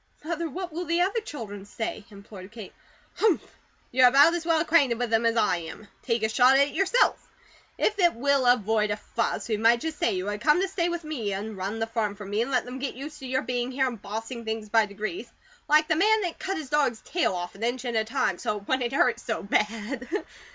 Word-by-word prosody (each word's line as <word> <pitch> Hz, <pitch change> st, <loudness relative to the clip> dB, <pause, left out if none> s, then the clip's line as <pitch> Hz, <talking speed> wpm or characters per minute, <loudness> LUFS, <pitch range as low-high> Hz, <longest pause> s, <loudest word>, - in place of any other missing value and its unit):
"Mother, 335 Hz, +1 st, -3 dB
what 355 Hz, +3 st, -6 dB
will 350 Hz, +2 st, -3 dB
the 340 Hz, +1 st, +1 dB
other 395 Hz, +6 st, +1 dB
children 220 Hz, -, -7 dB
say?" 220 Hz, +1 st, -5 dB
implored 200 Hz, -2 st, -12 dB
Kate. 225 Hz, -4 st, -10 dB, 0.4 s
"Humph! 425 Hz, -7 st, +1 dB, 0.4 s
You 255 Hz, -, +2 dB
are -, -, +10 dB
about 285 Hz, +6 st, +6 dB
as 345 Hz, -1 st, -3 dB
well 330 Hz, -1 st, +3 dB
acquainted 305 Hz, -7 st, +3 dB
with 240 Hz, -1 st, -2 dB
them 225 Hz, +1 st, +3 dB
as 230 Hz, 0 st, +1 dB
I 210 Hz, -6 st, +3 dB
am. 170 Hz, +5 st, -9 dB
Take 230 Hz, -3 st, -1 dB
a 220 Hz, -, +2 dB
shot 250 Hz, +4 st, +5 dB
at 280 Hz, +1 st, +4 dB
it -, -, -12 dB
yourself. 390 Hz, +6 st, +2 dB, 0.6 s
If 420 Hz, -1 st, 0 dB
it 345 Hz, -6 st, +4 dB
will 275 Hz, +1 st, +2 dB
avoid 220 Hz, -3 st, +3 dB
a 205 Hz, -, -1 dB
fuss, 230 Hz, +2 st, -3 dB
we 220 Hz, -2 st, 0 dB
might 230 Hz, +2 st, +4 dB
just 320 Hz, -2 st, -4 dB
say 230 Hz, -, +2 dB
you 185 Hz, 0 st, -3 dB
had 205 Hz, 0 st, -3 dB
to -, -, -9 dB
come 300 Hz, +4 st, +6 dB
to 385 Hz, -, +1 dB
stay 350 Hz, -2 st, -1 dB
with 345 Hz, -1 st, -4 dB
me, 245 Hz, -10 st, -3 dB
and 210 Hz, +2 st, -5 dB
run 195 Hz, +3 st, -4 dB
the 225 Hz, -, -1 dB
farm 225 Hz, -3 st, -2 dB
for 205 Hz, 0 st, -9 dB
me, 205 Hz, +3 st, -1 dB
and 240 Hz, -, -1 dB
let 255 Hz, -2 st, +1 dB
them 250 Hz, +1 st, -7 dB
get 275 Hz, 0 st, -4 dB
used 295 Hz, +4 st, -8 dB
to 265 Hz, -, -7 dB
your 260 Hz, +1 st, 0 dB
being 245 Hz, 0 st, -2 dB
here, 265 Hz, +1 st, +1 dB
and 240 Hz, -5 st, -4 dB
bossing 225 Hz, +4 st, -6 dB
things 220 Hz, -1 st, -4 dB
by 220 Hz, 0 st, +3 dB
degrees; 215 Hz, -, -6 dB, 0.4 s
like 305 Hz, +1 st, +5 dB
the 320 Hz, -, +2 dB
man 430 Hz, +6 st, +3 dB
that 350 Hz, -4 st, -4 dB
cut 385 Hz, 0 st, -3 dB
his 300 Hz, -5 st, -7 dB
dog's 275 Hz, -6 st, +1 dB
tail 340 Hz, -, 0 dB
off 175 Hz, 0 st, -5 dB
an 195 Hz, -, -14 dB
inch 245 Hz, +2 st, -2 dB
at 240 Hz, -1 st, -2 dB
a 220 Hz, -, +2 dB
time, 230 Hz, -5 st, -1 dB
so 210 Hz, -, -2 dB
it 200 Hz, -, -12 dB
wouldn't 260 Hz, -1 st, 0 dB
hurt 250 Hz, -3 st, +2 dB
so 225 Hz, -, -4 dB
bad." 220 Hz, +5 st, -1 dB
245 Hz, 250 wpm, -26 LUFS, 215-305 Hz, 0.6 s, are